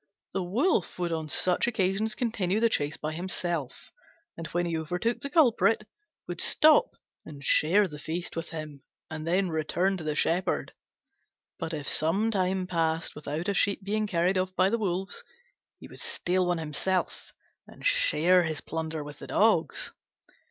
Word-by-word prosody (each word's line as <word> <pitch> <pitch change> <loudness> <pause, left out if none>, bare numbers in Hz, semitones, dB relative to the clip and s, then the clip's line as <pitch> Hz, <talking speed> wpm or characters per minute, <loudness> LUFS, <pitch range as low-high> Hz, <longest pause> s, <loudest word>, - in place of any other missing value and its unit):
The 195 - 0
Wolf 200 - 0
would 175 -1 -1
on 160 -2 -3
such 180 +8 +2
occasions 210 -1 0
continue 215 -5 0
the 230 0 +3
chase 145 -5 -1
by 155 0 -4
himself, 175 -4 -3 0.4
and 165 0 -6
when 175 0 -1
he 170 -1 -2
overtook 180 +9 -1
the 280 - -5
culprit, 235 -8 +3 0.4
would - - -2
stop 470 +11 +4 0.3
and 145 -2 -10
share 185 +9 +4
the 150 -3 -9
feast 170 +3 -4
with 165 0 -4
him, 155 -4 -7 0.3
and 155 0 -5
then 185 +2 +2
return 175 +4 0
to 165 - -7
the 155 -1 -2
Shepherd. 180 +4 0 0.9
But 160 - -3
if 150 -4 -4
some 195 +9 +2
time 185 -2 0
passed 165 -2 -1
without 150 +3 -4
a 200 - +1
sheep 200 0 +1
being 215 +2 -1
carried 185 0 +1
off 185 0 -2
by 185 +1 +3
the 230 - +1
wolves, 190 -2 -2 0.6
he - - -11
would - - -11
steal 185 - -1
one 175 -1 +1
himself 165 +4 -2 0.4
and - - -13
share 185 - +4
his 160 -3 -2
plunder 160 -1 -4
with 145 0 -10
the - - -9
dogs. - - +2
180 Hz, 165 wpm, -28 LUFS, 160-200 Hz, 0.9 s, stop